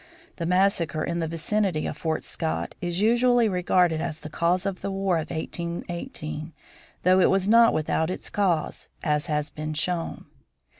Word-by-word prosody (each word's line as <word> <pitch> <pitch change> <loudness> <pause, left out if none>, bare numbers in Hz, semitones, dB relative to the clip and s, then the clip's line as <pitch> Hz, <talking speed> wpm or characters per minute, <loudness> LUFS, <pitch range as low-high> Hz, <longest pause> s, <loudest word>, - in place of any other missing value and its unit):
The 165 - -2
massacre 180 -4 +2
in 170 0 -2
the 165 - -1
vicinity 165 +1 0
of - - -3
Fort 160 +1 -2
Scott 160 -2 -3
is 175 +1 -2
usually 240 +1 +4
regarded 180 -3 +2
as 160 -2 -3
the 155 - -8
cause 175 +4 +1
of 195 -2 -3
the - - -3
war 195 -2 0
of 155 - -5
1818, 170 - -5 0.5
though 185 +1 +5
it - - +5
was 190 0 +2
not 230 +1 +7
without 160 +1 0
its 185 - -4
cause, 180 -6 0
as 150 -1 +1
has 150 -1 -1
been 155 +1 -5
shown. 165 +2 -2
170 Hz, 165 wpm, -25 LUFS, 155-195 Hz, 0.5 s, not